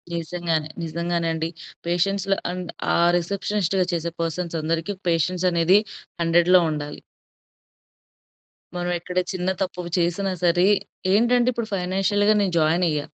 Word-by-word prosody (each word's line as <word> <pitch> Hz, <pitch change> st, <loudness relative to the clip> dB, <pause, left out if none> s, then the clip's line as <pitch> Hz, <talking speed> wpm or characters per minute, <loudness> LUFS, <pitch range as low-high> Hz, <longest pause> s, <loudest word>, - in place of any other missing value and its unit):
నిజంగానే. 165 Hz, -2 st, -2 dB
నిజంగానే 170 Hz, +1 st, -2 dB
అండి. 160 Hz, 0 st, -2 dB, 0.4 s
పేషెన్స్ 195 Hz, +3 st, 0 dB
ల -, -, +5 dB, 0.2 s
అండ్ 180 Hz, -1 st, -5 dB, 0.3 s
ఆ -, -, +3 dB, 0.2 s
రిసెప్షనిస్ట్‌గా 195 Hz, +1 st, 0 dB
చేసే 170 Hz, 0 st, -2 dB
పర్సన్స్ 165 Hz, +1 st, -2 dB
అందరికి 165 Hz, +5 st, -2 dB
పేషెన్స్ 170 Hz, +2 st, 0 dB
అనేది 170 Hz, +4 st, +4 dB, 0.4 s
100 175 Hz, +2 st, +5 dB
ఉండాలి. 150 Hz, -1 st, -5 dB, 1.7 s
మనం 175 Hz, 0 st, -2 dB
ఎక్కడ 180 Hz, +1 st, -7 dB
చిన్న 185 Hz, 0 st, -2 dB
తప్పు 180 Hz, -1 st, -2 dB, 0.2 s
చేసినా 180 Hz, +3 st, 0 dB
సరే 175 Hz, +2 st, +4 dB, 0.5 s
ఏంటంటే 240 Hz, +3 st, +3 dB
ఇప్పుడు 235 Hz, -1 st, -3 dB
ఫైనాన్షియల్‌గా 195 Hz, +3 st, +2 dB
నేను 190 Hz, -3 st, 0 dB
జాయిన్ 165 Hz, +3 st, +2 dB
అయ్యా. 150 Hz, -2 st, -1 dB
175 Hz, 125 wpm, -23 LUFS, 165-190 Hz, 1.7 s, ల